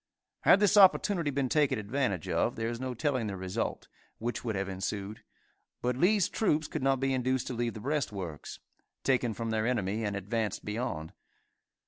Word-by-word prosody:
Had - - +6
this 205 0 +4
opportunity 190 -4 +5
been 140 -1 0
taken 145 -1 +2
advantage 105 - -1
of, - - +1
there 115 0 -2
is 120 0 -4
no 130 -1 -3
telling 130 -3 0
the 100 -2 -4
result, 95 +4 -3 0.3
which 120 +2 -3
would 115 -3 -2
have 95 0 -1
ensued, 100 +2 -4 0.6
but 125 0 0
Lee's 185 +6 +3
troops 155 -8 +1
could 155 - -4
not 135 0 +2
be 135 0 +1
induced 130 0 0
to - - -4
leave 120 -1 -2
the - - -6
breastworks, 105 - -3 0.5
taken 120 -4 +1
from 115 -1 -3
their 110 0 0
enemy 110 -3 0
and 105 -1 -1
advance 105 +1 -2
beyond. 105 -7 -4
120 Hz, 175 wpm, -30 LUFS, 105-135 Hz, 0.6 s, Had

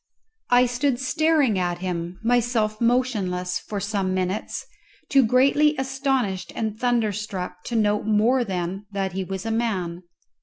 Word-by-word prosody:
I 245 0 +6
stood 245 +1 0
staring 270 -4 +2
at 175 -1 -1
him, 175 0 -4
myself 230 -2 +1
motionless, 210 -8 0
for 205 - -5
some 195 -2 -1
minutes, 185 +2 -2 0.4
too 275 -2 +5
greatly 275 +6 +4
astonished 265 -7 -1
and 220 -2 -2
thunder 235 -2 +1
struck 185 -3 -5
to 240 - -4
note 210 -1 +1
more 225 +4 +3
than 190 0 -4
that 195 -1 -2
he 190 +1 -3
was 190 +1 -5
a 225 - -1
man. 190 -7 -1
215 Hz, 145 wpm, -24 LUFS, 185-245 Hz, 0.4 s, I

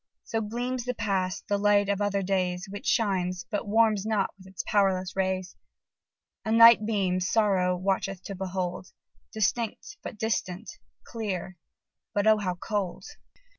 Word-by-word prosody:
So 225 - -2
gleams 245 +3 -3
the 250 0 -2
past, 190 -5 -1
the 205 0 +1
light 205 0 +4
of 200 0 0
other 200 -1 0
days, 185 -1 0
Which 200 +1 -7
shines, 185 -5 +1
but 205 -1 -2
warms 215 -1 +3
not 215 -2 0
with 190 -1 -16
its 190 -1 -6
powerless 190 -2 +1
rays; 185 -1 -1 0.9
A 220 - -2
night 230 -1 +8
beam 190 -4 +1
Sorrow 185 -2 +2
watcheth 195 0 -1
to 200 - -6
behold, 185 -1 -3 0.4
Distinct, 225 - -2
but 215 - -7
distant 215 - -2 0.3
clear 190 -5 -4 0.6
but 205 0 +2
oh! 220 -1 +5
how 185 -3 -2
cold! 195 0 -3
200 Hz, 145 wpm, -27 LUFS, 185-220 Hz, 0.9 s, night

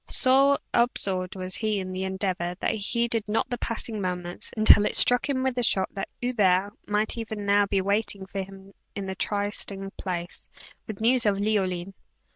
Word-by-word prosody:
So 275 +2 +5 0.2
absorbed 195 -6 +2
was 185 0 -4
he 215 -2 -1
in 185 -1 -5
the 185 +1 -3
endeavor, 185 -2 -2
that - - 0
he 220 - -3
heeded 230 +1 -1
not 225 +4 -1
the 245 - -2
passing 225 -2 -3
moments, 180 -1 -4
until 215 -1 +7
it - - -3
struck 245 +3 +3
him 260 -2 0
with 260 -2 0
a - - +1
shock 190 -4 +3
that 195 - -5
Hubert 205 -5 +1 0.2
might 210 +2 0
even 220 -2 -5
now 200 0 +3
be 195 -1 +1
waiting 200 0 0
for 195 0 -5
him 195 +1 -11 0.2
at 200 - -4
the 190 - -4
trysting 200 0 -3
place, 175 -1 -5 0.4
with 220 -2 -7
news 240 0 +3
of 200 -1 +2
Leoline. 195 -3 -1
200 Hz, 185 wpm, -26 LUFS, 190-225 Hz, 0.4 s, until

